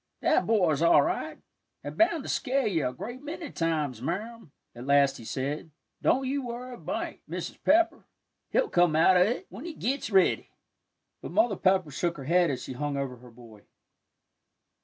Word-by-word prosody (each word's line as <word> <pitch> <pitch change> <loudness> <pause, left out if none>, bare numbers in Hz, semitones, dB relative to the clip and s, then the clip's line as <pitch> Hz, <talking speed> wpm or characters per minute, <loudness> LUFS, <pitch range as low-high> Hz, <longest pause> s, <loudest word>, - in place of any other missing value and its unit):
"That - - +2
boy's 180 -10 +2
all 170 0 +6
right, 350 +4 -3 0.5
and - - -6
bound 330 -3 +2
to - - -8
scare 270 0 0
ye 180 -7 +1
a 125 - -1
great 240 - -8
many 315 +2 -7
times, 155 -8 -1
Marm," 210 - -5 0.2
at 120 +2 -9
last 140 -1 +4
he - - -11
said. 140 +7 -4 0.3
"Don't 265 +1 +2
you 275 +1 -1
worry 245 +1 -6
a - - -9
mite, - - -4
Mrs. - - -6
Pepper, 335 +3 +3 0.4
he'll - - +2
come 175 -3 +3
out 170 +4 +5
o' 180 - +5
it, 220 +7 +1
when 205 +9 -9
he 335 -3 -6
gits 265 +2 -2
ready." 190 -3 +3 0.7
But - - -7
Mother 240 -11 +3
Pepper 185 -4 +2
shook 170 +4 -2
her 135 - -7
head 175 +4 +3
as 130 -3 -3
she - - -6
hung 145 +2 -3
over 135 -2 -3
her 125 +1 -15
boy. 115 -3 -15
180 Hz, 185 wpm, -28 LUFS, -, 0.7 s, all